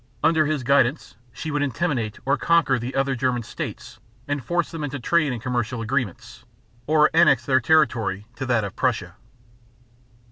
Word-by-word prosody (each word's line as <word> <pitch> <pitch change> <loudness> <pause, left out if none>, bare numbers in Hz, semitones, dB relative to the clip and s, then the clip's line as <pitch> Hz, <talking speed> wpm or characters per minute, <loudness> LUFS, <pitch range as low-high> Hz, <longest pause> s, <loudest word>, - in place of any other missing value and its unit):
Under 160 -2 +3
his 150 -4 -1
guidance 140 +2 +1 0.2
she 155 +6 -6
would 145 0 -1
intimidate 130 -5 -1
or 135 - +3
conquer 165 -6 +2
the 120 +3 -5
other 135 0 +1
German 125 -2 -1
states - - -7 0.3
and 145 -2 -2
force 175 +3 -1
them 165 -2 -5
into 145 0 -3
trade 155 +1 +1
and 120 - -4
commercial 125 0 -2
agreements, 115 -4 -4 0.4
or 155 0 +4
annex 155 -7 +4
their 130 -1 +3
territory 115 -9 +2
to 130 - -4
that 120 -3 +2
of 100 - -6
Prussia. - - -1
135 Hz, 165 wpm, -23 LUFS, 120-155 Hz, 0.4 s, or